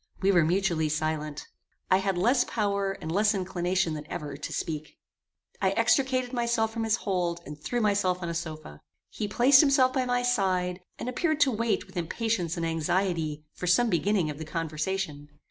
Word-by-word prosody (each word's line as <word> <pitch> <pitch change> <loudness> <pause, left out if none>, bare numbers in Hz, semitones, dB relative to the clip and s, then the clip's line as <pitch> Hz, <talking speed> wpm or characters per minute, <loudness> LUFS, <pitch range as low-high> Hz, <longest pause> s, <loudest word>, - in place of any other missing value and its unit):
We 195 +1 +3
were 175 -4 +5
mutually 170 -2 +1
silent. 155 -1 -2 0.4
I 185 - +7
had 190 -1 -1
less 245 +7 +3
power 200 -3 -1
and 160 - -6
less 210 +4 +3
inclination 180 -2 0
than 150 -1 -6
ever 145 -2 -5
to 145 - -6
speak. 155 -2 -4 0.6
I - - +3
extricated 260 -2 +2
myself 235 -2 0
from 225 -1 -2
his 220 0 +3
hold, 180 -6 -1
and 150 - -7
threw 240 +7 -1
myself 200 -4 +1
on - - -2
a 170 - -3
sofa. 155 - -6 0.3
He 210 - -3
placed 260 +6 +6
himself 270 -3 +4
by 260 -2 +1
my 245 0 0
side, 185 -7 +1 0.2
and - - -6
appeared 310 +4 0
to 280 -2 +5
wait 230 0 0
with - - -12
impatience 175 0 -1
and 165 - -1
anxiety 165 -1 -1
for 180 - -5
some 225 +6 +4
beginning 180 -2 +1
of 145 - -9
the - - -4
conversation. 160 -1 -3
190 Hz, 180 wpm, -28 LUFS, 165-225 Hz, 0.6 s, I